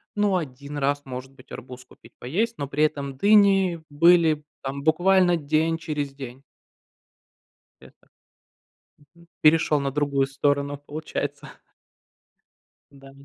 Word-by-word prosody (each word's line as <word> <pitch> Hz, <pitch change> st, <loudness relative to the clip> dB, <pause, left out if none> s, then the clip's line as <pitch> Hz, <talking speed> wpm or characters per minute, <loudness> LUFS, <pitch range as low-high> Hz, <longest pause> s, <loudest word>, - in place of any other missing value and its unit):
ну, 205 Hz, -2 st, +1 dB
1 140 Hz, -1 st, -7 dB
раз, 145 Hz, +1 st, 0 dB
может 130 Hz, +1 st, -8 dB
быть, 130 Hz, -2 st, -20 dB
арбуз 125 Hz, +1 st, -10 dB
купить -, -, -19 dB
поесть, 220 Hz, -, -2 dB
но 140 Hz, -, -3 dB
при 150 Hz, +2 st, 0 dB
этом 140 Hz, -3 st, -2 dB
дыни 195 Hz, -3 st, +4 dB
были 160 Hz, 0 st, +4 dB, 0.2 s
там 140 Hz, +1 st, -5 dB
буквально 175 Hz, +2 st, +3 dB
день 155 Hz, +2 st, 0 dB
через 150 Hz, -4 st, -4 dB
день. 135 Hz, -1 st, -10 dB, 1.4 s
Это, -, -, -20 dB, 0.9 s
мгм, 160 Hz, +4 st, -23 dB
перешел 155 Hz, -1 st, +4 dB
на 140 Hz, 0 st, -2 dB
другую 140 Hz, -1 st, 0 dB
сторону, 140 Hz, +1 st, -1 dB
получается. 145 Hz, -1 st, -6 dB, 1.4 s
Да. 135 Hz, -1 st, -15 dB
145 Hz, 120 wpm, -24 LUFS, 140-165 Hz, 1.4 s, дыни